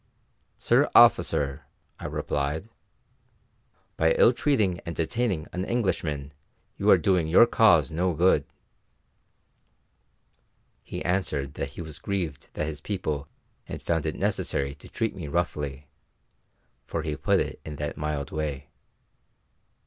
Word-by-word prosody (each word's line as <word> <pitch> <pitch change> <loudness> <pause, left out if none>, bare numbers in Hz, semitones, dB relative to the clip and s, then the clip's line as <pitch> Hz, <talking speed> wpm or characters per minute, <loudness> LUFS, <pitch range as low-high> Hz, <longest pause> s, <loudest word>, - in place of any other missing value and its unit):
"Sir - - +3
officer," 70 0 +4 0.3
I - - -5
replied, 75 +7 -2 1.3
"by 80 0 +4
ill 120 - +6
treating 110 - +1
and 85 -2 -7
detaining 85 0 -1
an 90 - -2
Englishman 80 - -2 0.4
you - - 0
are - - +8
doing 90 -4 +2
your 85 +8 +7
cause 100 - +4
no 90 +2 0
good." 90 +4 +4 2.4
He - - -7
answered 75 -7 -1
that 70 -1 -5
he 85 - -4
was 80 -3 -10
grieved 85 -9 -3
that 75 - -1
his 75 -2 -6
people 75 -8 -3 0.4
had - - -7
found 80 -2 0
it 80 - -2
necessary 80 -8 -1
to 70 - -15
treat 115 - -2
me 85 -5 -6
roughly, 75 -4 -2 1.0
for 80 - -3
he 75 -2 -2
put - - +2
it - - -3
in 75 - -7
that 75 0 -4
mild 75 -2 -3
way. 75 -3 -4
80 Hz, 130 wpm, -26 LUFS, 75-95 Hz, 2.4 s, are